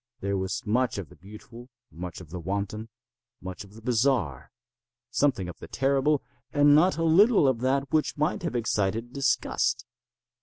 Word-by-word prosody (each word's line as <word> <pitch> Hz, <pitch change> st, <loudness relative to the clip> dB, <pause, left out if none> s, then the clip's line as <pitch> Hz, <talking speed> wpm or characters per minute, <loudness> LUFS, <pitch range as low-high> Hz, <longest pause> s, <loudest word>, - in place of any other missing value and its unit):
There 100 Hz, -2 st, -2 dB
was 95 Hz, 0 st, -3 dB
much 125 Hz, +3 st, +1 dB
of 95 Hz, -7 st, -6 dB
the -, -, -16 dB
beautiful, 110 Hz, +5 st, -13 dB, 0.2 s
much 90 Hz, +1 st, -7 dB
of 80 Hz, -4 st, -14 dB
the 90 Hz, -, -5 dB
wanton, 100 Hz, +5 st, -4 dB, 0.5 s
much 95 Hz, +2 st, -7 dB
of 100 Hz, +1 st, -17 dB
the 110 Hz, -, -13 dB
bizarre, 115 Hz, -, 0 dB, 0.6 s
something 130 Hz, -8 st, +1 dB
of 90 Hz, -, -9 dB
the -, -, -9 dB
terrible, 140 Hz, +2 st, +1 dB, 0.3 s
and 145 Hz, 0 st, +5 dB
not 165 Hz, +5 st, +4 dB
a 165 Hz, -, 0 dB
little 180 Hz, -, +5 dB
of 130 Hz, -3 st, +1 dB
that 135 Hz, +2 st, 0 dB
which 155 Hz, -1 st, +1 dB
might 150 Hz, +3 st, 0 dB
have 170 Hz, -7 st, -3 dB
excited 115 Hz, +1 st, -1 dB
disgust. 140 Hz, -1 st, 0 dB
120 Hz, 165 wpm, -27 LUFS, 100-140 Hz, 0.6 s, and